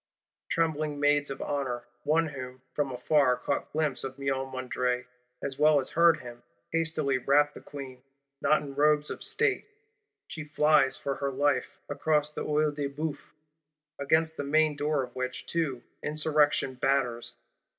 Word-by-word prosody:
Trembling 155 -3 0
Maids 145 0 +3
of 135 - -5
Honour, 130 -4 -2 0.2
one 160 +2 +2
of - - -10
whom 130 -1 -8
from 145 -2 -1
afar 125 +1 +3
caught 140 +3 -3
glimpse 150 -4 0
of 135 0 -6
Miomandre 130 -2 -2 0.4
as 135 -1 -3
well 150 0 +6
as 135 - +1
heard 170 -1 +4
him, 120 -1 -10 0.3
hastily 155 -5 +1
wrap 145 +3 +3
the - - -11
Queen; 130 -3 -9 0.4
not 155 0 +3
in 140 -1 -7
robes 150 +1 +3
of - - -6
State. - - 0 0.6
She 160 - -7
flies 150 -2 +3
for 140 - -2
her 140 - -1
life, 140 +1 0
across 150 -1 +1
the - - -4
Œil 150 0 +1
de 145 -1 -2
Bœuf; 145 +1 -4 0.8
against 160 +3 +1
the - - -2
main 155 +1 +2
door 145 -1 0
of 125 -1 -10
which 130 0 -4
too 145 -8 -2 0.2
Insurrection 150 -3 +1
batters. 125 -2 0
145 Hz, 155 wpm, -29 LUFS, 130-150 Hz, 0.8 s, well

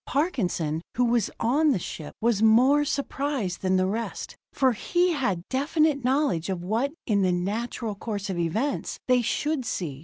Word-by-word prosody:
Parkinson, 185 - -1 0.2
who 250 - +4
was 235 -3 +2
on 290 +7 +3
the 270 - +3
ship, 160 -3 -7
was 225 -2 +2
more 250 +7 +5
surprised 275 -8 -2
than 185 0 +1
the 185 0 +3
rest, 220 +4 -4 0.2
for 265 -2 +3
he 350 - +1
had 200 - -1
definite 285 +1 +1
knowledge 255 - +1
of 180 -2 -3
what, 225 +9 0
in 205 -3 +2
the 185 -1 +2
natural 210 +5 -2
course 205 0 -4
of 185 -3 -3
events, 220 - -1
they 250 -1 +4
should 295 +4 -1
see. 160 - -4
230 Hz, 165 wpm, -26 LUFS, 190-280 Hz, 0.2 s, more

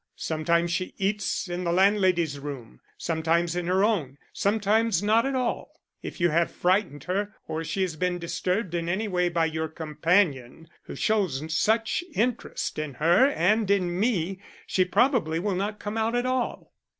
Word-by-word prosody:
Sometimes 170 +2 0
she 185 +2 -2
eats 200 0 -1
in 175 +1 -4
the 170 - 0
landlady's 185 -5 +2
room, 135 - -8 0.2
sometimes 165 +1 0
in 175 -1 -2
her 185 +2 +2
own, 165 - 0 0.2
sometimes 210 -1 +1
not 225 +4 +3
at 275 - -2
all. 255 -2 -3 0.2
If - - -7
you 175 0 +3
have 170 +1 +2
frightened 180 -6 0
her, 200 +3 -2
or 160 +1 -3
she 190 +4 -1
has 175 -4 -2
been 180 +1 0
disturbed 180 +2 -2
in 170 -1 -2
any 210 +5 -1
way 180 -2 +1
by 170 -1 +1
your 160 0 -2
companion 160 -2 0 0.2
who - - -8
shows 185 -10 0
such 225 - +1
interest 235 -8 -1
in 150 -4 -4
her 170 - +4
and 210 -2 +1
in 180 -3 +1
me, 195 -5 0 0.3
she 185 - +1
probably 200 - +2
will 195 +4 -1
not 205 +3 -2
come 210 +1 -4
out 225 +2 0
at 245 +1 0
all." 255 -1 -2
180 Hz, 170 wpm, -26 LUFS, 165-210 Hz, 0.3 s, her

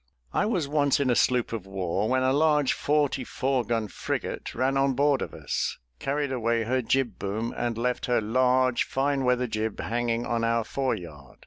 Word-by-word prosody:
I 210 - +2
was 180 -10 0
once 145 -1 +2
in 135 -3 +2
a - - +3
sloop 125 -1 +2
of 105 -4 -5
war, 95 +1 -1
when 130 0 +2
a 130 0 +3
large 150 -1 +3
forty 145 -3 +1
four 130 +1 -1
gun 115 -2 -1
frigate - - -4
ran 130 +3 +1
on 135 0 +2
board 140 +1 +2
of - - -4
us, - - -3 0.2
carried 140 0 -1
away 115 -2 0
her 130 +3 0
jib 130 +1 0
boom, 110 +4 -3
and 120 -2 -2
left 125 +1 -1
her 125 - +3
large 125 +2 +2
fine 135 0 0
weather 125 0 +2
jib 110 -2 -3
hanging 120 0 -1
on 115 -1 -1
our 115 0 +2
foreyard. 85 - -4
125 Hz, 190 wpm, -27 LUFS, 115-135 Hz, 0.2 s, a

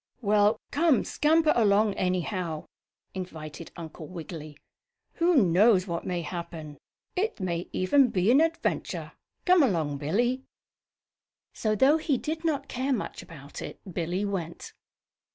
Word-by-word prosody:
"Well, 210 +1 +3
come, 310 -3 +3
scamper 310 +1 +3
along, 210 -2 +4
anyhow," 180 -3 -2 0.5
invited 165 -4 -7
Uncle 160 -1 -8
Wiggily. 160 -4 -8 0.6
"Who 345 +1 +4
knows 185 +2 +4
what 170 -3 -4
may 175 -2 -2
happen? 160 -4 -7 0.4
It 420 - -1
may 175 -2 -2
even 255 +9 +4
be 190 +1 +2
an 275 +5 +6
adventure. 330 0 -1 0.3
Come 360 -1 +6
along, 160 - +1
Billie." 240 - 0 1.1
So, 215 -1 0
though 270 +8 +5
he 310 -4 0
did 315 +5 -4
not 290 -4 -1
care 265 +2 -1
much 225 - -4
about 145 -5 -10
it, - - -7
Billie 175 +4 -1
went. 180 -5 -5
195 Hz, 130 wpm, -27 LUFS, 170-265 Hz, 1.1 s, an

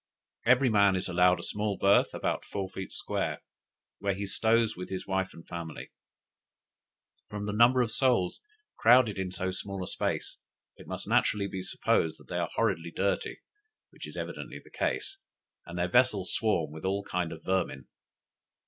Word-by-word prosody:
Every 130 +2 +5
man 100 -2 +5
is 95 - +1
allowed 90 0 +4
a - - -4
small 105 -1 -1
berth, 100 +1 +4
about - - -1
four 100 -2 -4
feet 95 - -6
square, - - -3 0.6
where 100 -1 0
he 100 +1 -3
stows 115 +2 +2
with 90 +1 -7
his 95 -1 -4
wife 95 0 0
and 85 - -14
family. 85 -2 -7 1.4
From 105 0 -4
the 105 - -2
number 120 +3 +5
of 115 - -3
souls 120 -8 +2 0.4
crowded 115 -3 +5
in 95 -1 -2
so 95 +1 -2
small 95 0 -5
a - - -5
space, - - -2 0.4
it - - -14
must - - -5
naturally 100 -1 +2
be 95 -1 -5
supposed 80 -3 0
they - - -2
are - - -1
horridly 85 +1 0
dirty, 100 +4 -1 0.5
which - - -9
is - - -10
evidently - - -5
the - - -16
case, 390 - -2 0.5
and 85 0 -7
their 90 0 +1
vessels 105 -3 +2
swarm 85 -9 +1
with 80 0 -9
all 100 +1 0
kinds 90 -3 -2
of 80 - -11
vermin. 95 -8 -1
95 Hz, 170 wpm, -29 LUFS, 90-105 Hz, 1.4 s, Every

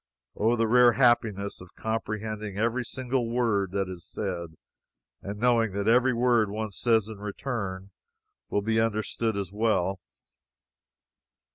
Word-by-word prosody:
Oh, 115 +3 +2
the 115 -1 +1
rare 120 +1 +6
happiness 115 -7 +2
of 90 - -14
comprehending 110 -2 -4
every 115 +4 0
single 125 -1 -2
word 115 -5 +1
that 100 -1 0
is 90 -2 -8
said, 85 -4 -5 0.7
and 100 +1 -6
knowing 115 -3 +2
that 100 +1 -2
every 125 +3 +5
word 120 -3 +2
one 110 +1 -4
says 110 +1 +2
in 110 -2 -8
return 100 -3 -4 0.6
will 100 - 0
be 110 +1 +2
understood 110 0 -1
as 95 -3 -3
well! 100 -3 0
110 Hz, 135 wpm, -27 LUFS, 100-120 Hz, 0.7 s, rare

